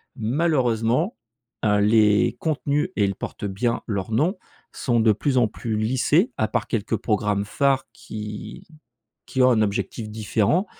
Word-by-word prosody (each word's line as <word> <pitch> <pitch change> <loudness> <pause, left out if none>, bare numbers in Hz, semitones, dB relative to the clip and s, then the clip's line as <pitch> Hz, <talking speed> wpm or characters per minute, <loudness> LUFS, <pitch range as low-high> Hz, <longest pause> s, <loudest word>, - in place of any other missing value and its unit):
Malheureusement, 125 - +1 0.5
heu, 105 -1 +3
les 105 0 +4
contenus 150 -1 0
et 105 - +2
ils 100 -1 0
portent - - -7
bien 110 +4 -1
leurs 100 0 -3
noms, 165 - +1 0.3
sont 120 -4 0
de 110 -1 +5
plus 130 +6 0
en 120 -3 +4
plus 110 +1 -4
lissés, 130 - +2
à 110 - +1
part - - -2
quelques 115 0 -1
programmes 105 -2 0
phares 135 +5 +1
qui 105 - -8 0.6
qui 130 - 0
ont 130 - +6
un 110 -2 +3
objectif 105 +1 -2
différent. 110 - +1
115 Hz, 150 wpm, -23 LUFS, 105-135 Hz, 0.6 s, ont